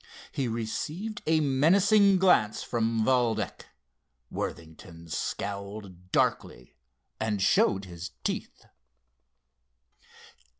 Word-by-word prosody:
He 135 - -2
received 150 - -4
a 160 0 +3
menacing 190 +8 +4
glance 175 - +3
from 115 -1 0
Valdec. 120 -3 0 0.6
Worthington 85 +1 -7
scowled 100 0 -5
darkly 60 - -1 0.4
and 110 -2 -1
showed 95 0 +3
his 90 0 -8
teeth. - - -4
110 Hz, 80 wpm, -28 LUFS, 95-155 Hz, 0.6 s, menacing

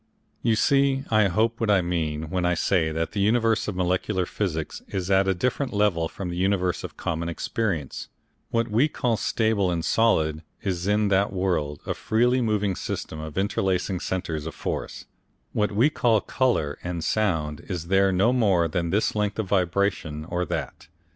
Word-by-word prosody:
You 115 -2 +2
see, 135 +3 +3
I 110 -2 +5
hope, 110 +5 +1
what 115 - +1
I 100 -3 +4
mean, 80 -3 -2
when 90 -1 0
I 90 0 +2
say 85 -2 +1
that 80 +1 -2
the 105 - -3
universe 115 +1 +2
of 105 - -3
molecular 90 +1 0
physics 85 -5 -3
is 95 -1 -3
at 95 0 +4
a 95 - +2
different 125 +7 -1
level 100 -6 +1
from 95 -3 -6
the 85 - -5
universe 90 -1 0
of - - -8
common 85 +1 -2
experience; 85 - -3 0.4
what 115 0 0
we 115 +6 +3
call 125 -6 0
stable 110 -3 +1
and 85 -2 -1
solid 80 -9 +2 0.2
is 95 -2 -2
in 105 0 +2
that 100 +1 +2
world 85 -6 -1
a - - -1
freely 125 +3 +2
moving 105 -4 0
system 80 - -5
of 80 +1 -7
interlacing 95 -1 0
centres 85 -5 -3
of - - -7
force, - - -4 0.5
what 105 -1 +1
we 110 +7 +4
call 115 -6 +3
colour 110 - 0
and 90 -2 -3
sound 80 -9 0
is 90 -4 -3
there 95 0 +4
no 100 +7 +3
more 100 -9 +3
than 85 +1 -2
this 100 +5 +1
length 105 -2 -1
of 110 -4 -2
vibration 90 -5 0
or 90 +1 -2
that. - - -5
95 Hz, 180 wpm, -25 LUFS, 85-110 Hz, 0.5 s, I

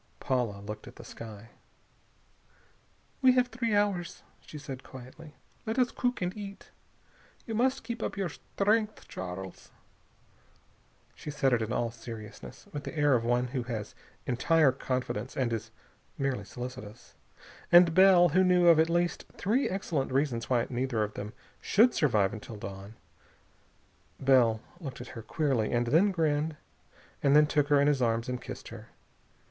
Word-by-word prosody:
Paula 120 -6 -1
looked 105 +1 -8
at - - -12
the - - -11
sky. 110 -1 -10 1.7
"We 260 -1 +6
have 250 -1 +2
three 230 -2 -1
hours," 200 -4 0 0.2
she 155 - -10
said 135 -3 -7
quietly. 130 +5 -12 0.3
"Let 220 +3 -2
us 250 -2 +3
cook 245 -6 -1
and 180 +1 -2
eat. 200 -2 -9 0.7
You 225 - -5
must 260 +4 +1
keep 235 0 -5
up - - -3
your 195 -3 -1
strength, 210 +6 -1
Charles." 95 0 -7 1.4
She - - -9
said 140 -3 +1
it 120 - +2
in 110 - -3
all 115 -1 0
seriousness, 115 -2 -10
with 145 - -5
the - - -7
air 145 -1 +4
of 120 -2 +2
one 120 +1 +1
who 130 0 -2
has 115 -4 -5 0.3
entire 150 +4 +3
confidence 130 -2 -3
and 125 -3 0
is 115 - -4 0.5
merely 135 -7 -1
solicitous. 120 -2 -9 0.6
And 175 -1 +7
Bell, 185 -1 +7
who 185 +5 +4
knew 180 -1 +5
of 165 -2 +6
at 160 +1 +4
least 175 +1 0
three 230 +9 +1
excellent 165 -9 -2
reasons 130 -4 0
why 120 -3 +2
neither 120 -3 0
of 105 0 -4
them 105 +1 -6 0.3
should 230 +5 +4
survive 105 -10 +2
until 110 +1 -8
dawn 100 +1 -8 1.2
Bell 125 -5 +4 0.2
looked 135 -8 -7
at 125 - -8
her 115 - -8
queerly, 130 -4 0
and 120 0 +1
then 165 +12 +4
grinned, 155 -3 0 0.6
and 140 0 +4
then 150 0 +7
took 150 -1 +1
her 145 -1 +4
in 140 - +4
his 145 -2 +2
arms 115 -1 +1
and 125 0 -3
kissed - - -8
her. - - -10
135 Hz, 160 wpm, -29 LUFS, 115-175 Hz, 1.7 s, And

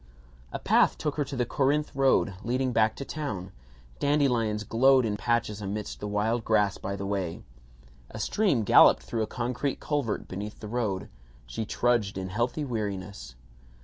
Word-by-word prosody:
A - - -3
path - - +3
took 150 - -2
her 150 - +2
to 135 +1 -6
the 125 -1 0
Corinth 145 +4 +1
road, 135 -6 +3
leading 125 +2 0
back 110 -1 +3
to 140 - -6
town. 105 -14 -5 0.5
Dandelions 125 -7 +1
glowed 130 +4 +4
in 105 -2 -1
patches 110 0 -1
amidst 105 +1 -4
the 105 - -4
wild 110 +3 0
grass 105 -3 +2
by 100 - -4
the 100 0 -5
way. 95 -4 -3 0.7
A - - -9
stream 135 - +1
golloped - - +6
through 115 - -3
a 110 - -1
concrete 125 +4 -2
culvert 145 -8 -2
beneath 105 +3 -6
the 105 - -7
road. 105 -5 -2 0.4
She - - -4
trudged 115 -4 0
in 95 -1 -4
healthy 120 +9 -1
weariness. 100 - -5
110 Hz, 165 wpm, -27 LUFS, 100-130 Hz, 0.7 s, golloped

